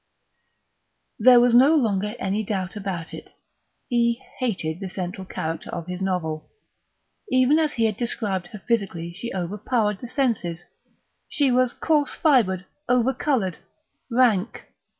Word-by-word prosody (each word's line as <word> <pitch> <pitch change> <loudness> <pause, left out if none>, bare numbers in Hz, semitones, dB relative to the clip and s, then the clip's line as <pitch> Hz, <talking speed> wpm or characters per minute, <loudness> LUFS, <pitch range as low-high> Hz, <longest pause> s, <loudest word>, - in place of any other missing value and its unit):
There 245 +2 +8
was 245 0 +4
no 270 +6 +6
longer 210 -5 0
any 200 +3 -1
doubt 190 -2 -3
about 190 -5 -5
it; - - -10 0.5
he 235 -1 +1 0.2
hated 180 -10 -2
the 195 -2 -5
central 185 +1 -5
character 165 -3 -5
of 170 - -5
his 180 +1 -6
novel. 165 -5 -2 0.8
Even 255 +4 +4
as 310 -2 +1
he 230 - +1
had 215 -2 0
described 205 -6 -2
her 205 +1 -11
physically 190 -7 -1
she 225 +7 -5
overpowered 210 +3 -1
the 245 - -7
senses; 215 - -1 0.6
she 280 -3 +2
was 250 0 +2
coarse 300 -3 +1
fibred, 210 - +2 0.2
over 250 +1 +3
coloured, 245 - -1 0.5
rank. 235 -5 +1
210 Hz, 135 wpm, -24 LUFS, 185-250 Hz, 0.8 s, There